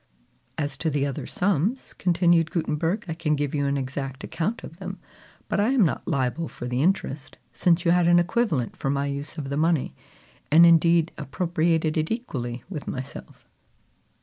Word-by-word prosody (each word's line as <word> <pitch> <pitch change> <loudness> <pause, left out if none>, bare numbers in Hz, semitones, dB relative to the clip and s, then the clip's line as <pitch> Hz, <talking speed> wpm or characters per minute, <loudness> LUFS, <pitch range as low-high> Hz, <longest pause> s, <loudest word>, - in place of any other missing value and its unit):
"As 145 -2 -2
to 160 - 0
the 145 -2 0
other 140 -2 -4
sums," 200 - 0
continued 170 -2 +2
Gutenberg, 165 +3 -1
"I 165 - -2
can 160 -2 0
give 145 -1 -2
you 145 -1 0
an 140 0 0
exact 135 +1 -4
account 200 +8 -3
of 165 - -10
them; 190 0 -6 0.5
but - - -1
I 210 +3 +3
am 240 -8 +5
not 140 - -2
liable 140 +1 -1
for 120 - -7
the 125 +1 -1
interest, 150 -5 -1 0.2
since 175 0 +2
you 170 - +4
had 175 -1 +4
an 175 0 +6
equivalent 175 - +1
for 135 - -3
my 140 0 0
use 140 +3 -5
of 140 -3 -4
the 140 - -2
money, 160 - +1 0.6
and 165 +3 +8
indeed 170 0 +5
appropriated 160 +1 0
it 155 0 0
equally 125 - -4
with 165 -6 -7
myself." 130 +1 -7
160 Hz, 175 wpm, -25 LUFS, 140-175 Hz, 0.6 s, and